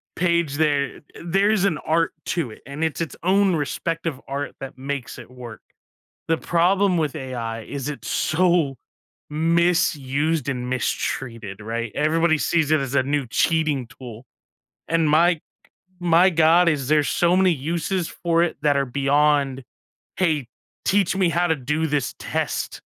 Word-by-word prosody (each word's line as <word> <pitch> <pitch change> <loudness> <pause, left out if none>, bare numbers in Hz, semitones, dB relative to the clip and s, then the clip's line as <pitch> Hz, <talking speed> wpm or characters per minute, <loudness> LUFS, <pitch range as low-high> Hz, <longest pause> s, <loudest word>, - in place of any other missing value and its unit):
page 170 -4 +1
there. 145 -3 0 0.2
There's 195 +3 +2
an 165 -6 +1
art 165 +1 0 0.2
to 135 -9 -1
it, - - -13
and 140 +3 -5
it's 160 0 -1
its 165 - -4
own 190 0 +3
respective 165 0 -3
art 140 +1 -4
that 135 -1 -8
makes 135 -1 -5
it - - -12
work. 125 -3 -10 0.7
The 165 - +3
problem 185 +2 +2
with 155 -3 -1
AI 120 -5 -5
is 140 +4 -5
it's 145 -5 -6
so 165 -4 +1 0.5
misused 160 -3 +1
and 125 -2 -3
mistreated, 115 -4 -3
right? 115 +2 -4
Everybody 160 +2 +2
sees 160 -1 +1
it 155 -1 +4
as 135 -1 -4
a 140 - +4
new 140 0 -1
cheating 150 +1 +1
tool. 120 -2 -11 0.6
And 165 -1 +2
my 170 +4 +4
g 160 - -17 0.6
my 175 +2 +5
god, 165 +1 +4
is 140 -4 -2
there's 150 -1 +3
so 175 +1 +2
many 185 -1 +4
uses 170 +4 -2
for 170 -1 0
it 175 - 0
that 145 -1 +3
are 140 -1 +1
beyond, 140 0 +1 0.6
"Hey, 155 -8 +1 0.4
teach 195 -1 +2
me 190 -3 +2
how 175 +1 +1
to 160 - +2
do 150 +4 -1
this 145 -4 -1
test." - - -3
155 Hz, 155 wpm, -23 LUFS, 135-170 Hz, 0.7 s, my